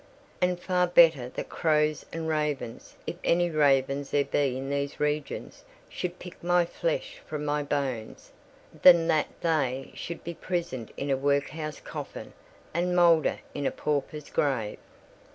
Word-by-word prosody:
"And 180 Hz, 0 st, +2 dB
far 180 Hz, 0 st, +1 dB
better 165 Hz, -8 st, +5 dB
that -, -, -6 dB
crows 155 Hz, -2 st, +1 dB
and 165 Hz, 0 st, -4 dB
ravens—if 150 Hz, -6 st, -3 dB
any 175 Hz, 0 st, +2 dB
ravens 140 Hz, -2 st, +2 dB
there 145 Hz, -1 st, +2 dB
be 135 Hz, -3 st, 0 dB
in 135 Hz, +1 st, -4 dB
these 140 Hz, 0 st, -2 dB
regions—should 175 Hz, -, -4 dB
pick 180 Hz, -2 st, -11 dB
my 175 Hz, 0 st, +3 dB
flesh -, -, -3 dB
from 150 Hz, -1 st, -4 dB
my 150 Hz, 0 st, 0 dB
bones, 135 Hz, -6 st, -3 dB, 0.5 s
than 170 Hz, -2 st, +8 dB
that 155 Hz, -2 st, +3 dB
they 135 Hz, -5 st, 0 dB
should 170 Hz, -, -7 dB
be 170 Hz, -, -5 dB
prisoned 170 Hz, -, -3 dB
in 140 Hz, 0 st, -2 dB
a 135 Hz, -, +2 dB
workhouse 145 Hz, +2 st, -1 dB
coffin -, -, -7 dB, 0.4 s
and 180 Hz, +2 st, 0 dB
moulder 170 Hz, -3 st, +4 dB
in 145 Hz, -1 st, -1 dB
a -, -, 0 dB
pauper's 150 Hz, 0 st, -3 dB
grave." 125 Hz, -7 st, 0 dB
150 Hz, 140 wpm, -28 LUFS, 140-170 Hz, 0.5 s, than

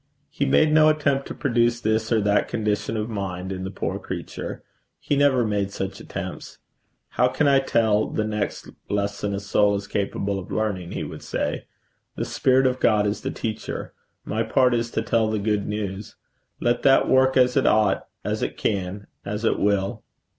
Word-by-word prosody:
He 140 Hz, -, -1 dB
made 150 Hz, +3 st, +4 dB
no 155 Hz, 0 st, +6 dB
attempt 140 Hz, -3 st, +1 dB
to -, -, -6 dB
produce 120 Hz, -3 st, +1 dB
this 110 Hz, 0 st, 0 dB
or 115 Hz, -, +4 dB
that 100 Hz, 0 st, +2 dB
condition 105 Hz, 0 st, -1 dB
of 105 Hz, 0 st, -2 dB
mind 95 Hz, -4 st, -4 dB
in 95 Hz, -1 st, -4 dB
the 95 Hz, -, -3 dB
poor 95 Hz, -, -3 dB
creature. -, -, -6 dB, 0.4 s
He 145 Hz, -, -1 dB
never 140 Hz, -4 st, +3 dB
made 100 Hz, -2 st, 0 dB
such 95 Hz, 0 st, -5 dB
attempts. -, -, -7 dB, 0.5 s
'How 125 Hz, -, +2 dB
can 145 Hz, +3 st, +1 dB
I 140 Hz, -1 st, +5 dB
tell 110 Hz, -5 st, +2 dB
the 110 Hz, -, -1 dB
next 105 Hz, -1 st, -3 dB, 0.2 s
lesson 100 Hz, 0 st, -1 dB
a -, -, -2 dB
soul 100 Hz, +1 st, +2 dB
is 100 Hz, 0 st, -4 dB
capable 100 Hz, 0 st, -2 dB
of 90 Hz, -, -10 dB
learning?' 100 Hz, -5 st, -2 dB
he -, -, -3 dB
would -, -, -7 dB
say. -, -, -3 dB, 0.5 s
'The -, -, -2 dB
Spirit 130 Hz, 0 st, +2 dB
of 130 Hz, 0 st, +1 dB
God 105 Hz, -2 st, +3 dB
is 105 Hz, +1 st, -1 dB
the -, -, -3 dB
teacher. 110 Hz, -1 st, -5 dB, 0.3 s
My 110 Hz, -, -1 dB
part 125 Hz, +3 st, +3 dB
is 115 Hz, 0 st, 0 dB
to 110 Hz, -, -2 dB
tell 115 Hz, -1 st, +1 dB
the 110 Hz, -, 0 dB
good 105 Hz, -1 st, 0 dB
news. 105 Hz, -1 st, -4 dB, 0.4 s
Let 120 Hz, 0 st, +1 dB
that 135 Hz, -1 st, +5 dB
work 130 Hz, 0 st, +4 dB
as 125 Hz, -1 st, +4 dB
it 135 Hz, -, +3 dB
ought, 105 Hz, -3 st, +2 dB, 0.2 s
as -, -, -2 dB
it -, -, -3 dB
can, 100 Hz, 0 st, -2 dB, 0.2 s
as 105 Hz, +3 st, -3 dB
it -, -, +2 dB
will.' 100 Hz, +2 st, 0 dB
110 Hz, 190 wpm, -24 LUFS, 100-125 Hz, 0.5 s, no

